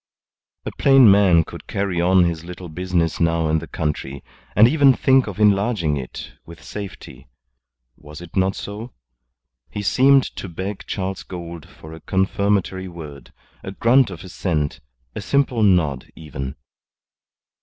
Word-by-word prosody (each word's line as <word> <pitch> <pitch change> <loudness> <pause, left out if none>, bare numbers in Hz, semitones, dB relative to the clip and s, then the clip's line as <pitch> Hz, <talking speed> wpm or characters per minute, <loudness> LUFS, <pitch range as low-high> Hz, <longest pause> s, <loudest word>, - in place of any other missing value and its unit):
A - - -4
plain 135 -6 +7
man 95 -5 +5
could - - -12
carry 95 -3 -2
on 90 +1 +4
his 85 -2 -2
little 90 0 -9
business 85 0 -1
now 85 -1 +1
in 80 +1 +2
the - - -9
country, 70 -3 -4 0.3
and 110 +2 +7
even 140 -2 +4
think 130 +1 +3
of - - -7
enlarging 100 -6 +2
it 65 -3 -7
with 85 0 -14
safety. 100 -10 -9 0.7
Was 75 +1 -12
it 85 -1 -12
not 95 0 +1
so? 105 +4 -8 0.7
He 105 - -5
seemed 135 +6 +4
to 95 - -6
beg 95 +4 -6
Charles 95 0 -4
Gould 85 -4 -9
for 80 0 -13
a 80 - -10
confirmatory 95 0 -1
word, 80 -5 -11 0.3
a 95 - -7
grunt 120 +3 +3
of 90 -4 -9
assent, 80 -5 -3 0.3
a - - -5
simple 140 -4 0
nod 85 -10 +2
even. 70 -3 -7
95 Hz, 145 wpm, -21 LUFS, 80-105 Hz, 0.7 s, plain